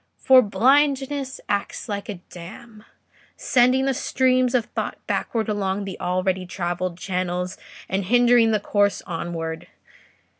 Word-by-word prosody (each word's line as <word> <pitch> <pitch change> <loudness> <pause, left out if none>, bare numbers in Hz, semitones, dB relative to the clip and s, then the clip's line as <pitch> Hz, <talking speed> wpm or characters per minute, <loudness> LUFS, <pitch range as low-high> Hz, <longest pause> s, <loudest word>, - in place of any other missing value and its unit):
For 260 -1 +6
blindness 270 +5 +1
acts 200 -1 -2
like 205 -2 -5
a 205 - -3 0.2
dam, 210 +5 -11 0.5
sending 255 +1 +3
the 270 - +1
streams 255 -1 +1
of 235 -3 +2
thought - - -4
backward 225 -3 -2
along 200 -1 -1
the 190 -2 -7
already 185 0 -1
travelled 175 0 -3
channels 180 -1 -3 0.3
and 190 0 -2
hindering 240 +1 +4
the 215 -1 +2
course 205 0 +1
onward. 165 -1 -5
205 Hz, 125 wpm, -23 LUFS, 185-250 Hz, 0.5 s, For